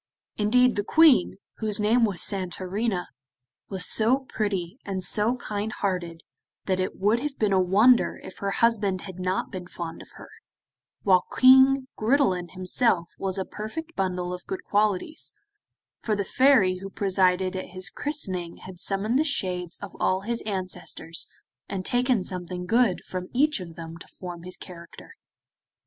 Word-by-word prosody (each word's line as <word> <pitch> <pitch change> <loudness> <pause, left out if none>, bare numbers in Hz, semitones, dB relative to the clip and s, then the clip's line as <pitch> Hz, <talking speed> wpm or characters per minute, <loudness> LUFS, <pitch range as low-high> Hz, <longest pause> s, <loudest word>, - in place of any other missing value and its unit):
Indeed 245 +3 +3
the 205 - 0
Queen, 310 - +5 0.2
whose 215 -2 -2
name 225 +3 +3
was 195 -6 -1
Santorina, 190 +1 -2 0.6
was 190 -2 +1
so 230 +4 +5
pretty 200 0 -3
and 190 -2 -4
so 215 +6 +2
kind 215 -3 -4
hearted 175 -5 -3 0.4
that 185 -1 0
it 185 - -2
would 210 +4 +3
have 285 +1 -4
been 210 -2 +1
a 190 - +4
wonder 210 +7 +4
if - - -11
her 200 - -2
husband 205 -4 +1
had 185 -2 -9
not 185 +1 -2
been 180 -2 -7
fond 170 -2 -7
of - - -13
her, - - -12 0.7
while 185 -3 +4
King 265 +1 +6
Gridelin 215 - +1
himself 185 -1 +1
was 195 0 -1
a 190 - -2
perfect 320 +11 -7
bundle 180 -1 -2
of 180 -1 -8
good 190 - -5
qualities, 210 - 0 0.7
for 215 - 0
the 200 -1 -2
Fairy 235 -10 +4
who 195 +1 -7
presided 185 -2 +1
at 185 - -4
his 185 -3 -5
christening 185 - -2
had 185 -2 -10
summoned 205 +7 0
the - - +4
shades 180 - -2
of 200 - -8
all 185 0 +1
his 235 +3 -2
ancestors, 185 -4 -4 0.4
and 185 -2 -4
taken 245 -4 +2
something 180 -1 -5
good 225 -1 +2
from 185 -1 -5
each 295 0 +3
of 170 -3 -9
them 165 0 -9
to - - -12
form 175 -2 -9
his 180 +1 -6
character. 170 -2 -12
195 Hz, 160 wpm, -26 LUFS, 180-230 Hz, 0.7 s, King